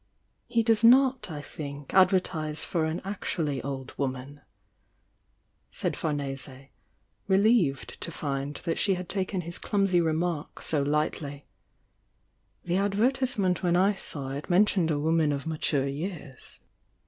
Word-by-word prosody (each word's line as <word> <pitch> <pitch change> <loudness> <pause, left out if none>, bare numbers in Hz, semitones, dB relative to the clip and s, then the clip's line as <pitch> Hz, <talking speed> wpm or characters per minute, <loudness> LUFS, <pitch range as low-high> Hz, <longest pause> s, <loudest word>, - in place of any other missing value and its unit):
He 235 -1 +2
does 225 0 +3
not, 260 0 +5
I 150 -3 -6
think, 145 -1 -8
advertise 180 -5 +3
for 165 -3 0
an 160 +2 -3
actually 160 -8 -2
old 135 -1 -5
woman 135 +1 -4 1.3
said - - -2
Farnese, 135 -2 -4 0.6
relieved 195 - +2
to - - -2
find 140 -2 -3
that 165 - -1
she 195 -2 +2
nad 180 0 -6
taken 190 -1 -2
his 170 0 -6
clumsy 195 -4 +2
remark 160 -1 -2
so 150 -3 +1
lightly. 145 0 -1 1.2
"The 180 +1 +1
ad 200 0 0
vertisement 235 -6 +1
when 175 -1 +2
I 195 +3 +4
saw 140 -8 -3
it 140 +2 -6
mentioned 185 -2 +3
a 150 - +1
woman 160 0 +2
of 140 0 -3
mature 150 -3 0
years." 145 -2 -6
160 Hz, 135 wpm, -28 LUFS, 145-190 Hz, 1.3 s, not